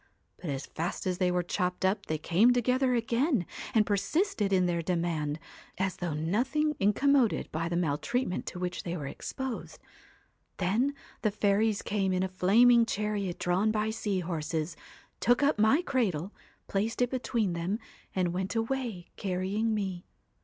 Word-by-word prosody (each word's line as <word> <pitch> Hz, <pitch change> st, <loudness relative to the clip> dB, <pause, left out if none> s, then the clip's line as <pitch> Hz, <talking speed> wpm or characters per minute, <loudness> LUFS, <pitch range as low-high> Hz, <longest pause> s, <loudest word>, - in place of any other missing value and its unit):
But 175 Hz, -, -6 dB
as 135 Hz, -1 st, -3 dB
fast 170 Hz, +3 st, -4 dB
as 180 Hz, -1 st, -1 dB
they 185 Hz, -1 st, +3 dB
were 180 Hz, 0 st, +1 dB
chopped 180 Hz, +1 st, -1 dB
up 195 Hz, +1 st, 0 dB
they 155 Hz, -, 0 dB
came 195 Hz, +10 st, +4 dB
together 250 Hz, +1 st, +2 dB
again, 235 Hz, -, +1 dB, 0.3 s
and 215 Hz, -1 st, +5 dB
persisted 210 Hz, -, 0 dB
in 185 Hz, -2 st, +4 dB
their 170 Hz, -1 st, 0 dB
demand, 165 Hz, -4 st, -1 dB, 0.4 s
as 190 Hz, 0 st, -1 dB
though 175 Hz, -4 st, -2 dB
nothing 260 Hz, -, +1 dB
in 200 Hz, +1 st, +4 dB
commoded 275 Hz, -2 st, +2 dB
by 165 Hz, +2 st, -2 dB
the 170 Hz, -, -1 dB
maltreatment 180 Hz, -, -1 dB
to -, -, -5 dB
which 180 Hz, 0 st, -3 dB
they 175 Hz, 0 st, -4 dB
were 145 Hz, -, -5 dB
exposed. 265 Hz, -, -5 dB, 0.8 s
Then 225 Hz, +10 st, +1 dB, 0.3 s
the 215 Hz, -, +2 dB
fairies 210 Hz, +1 st, +1 dB
came 195 Hz, -2 st, 0 dB
in 185 Hz, 0 st, +1 dB
a -, -, +1 dB
flaming 230 Hz, +6 st, +5 dB
chariot 210 Hz, -4 st, -2 dB
drawn 185 Hz, +5 st, +1 dB
by 215 Hz, 0 st, 0 dB
sea 205 Hz, -4 st, -1 dB
horses, 160 Hz, -1 st, -3 dB, 0.4 s
took 245 Hz, +4 st, +3 dB
up 285 Hz, -5 st, +3 dB
my 220 Hz, +11 st, +4 dB
cradle, 200 Hz, -, 0 dB, 0.3 s
placed 220 Hz, +5 st, 0 dB
it 245 Hz, -, -1 dB
between 235 Hz, -7 st, 0 dB
them, 170 Hz, +5 st, -1 dB, 0.4 s
and 180 Hz, -2 st, +1 dB
went 190 Hz, +4 st, -2 dB
away, 225 Hz, -5 st, -2 dB
carrying 195 Hz, +4 st, -1 dB
me. 190 Hz, -4 st, -3 dB
195 Hz, 160 wpm, -30 LUFS, 180-230 Hz, 0.8 s, and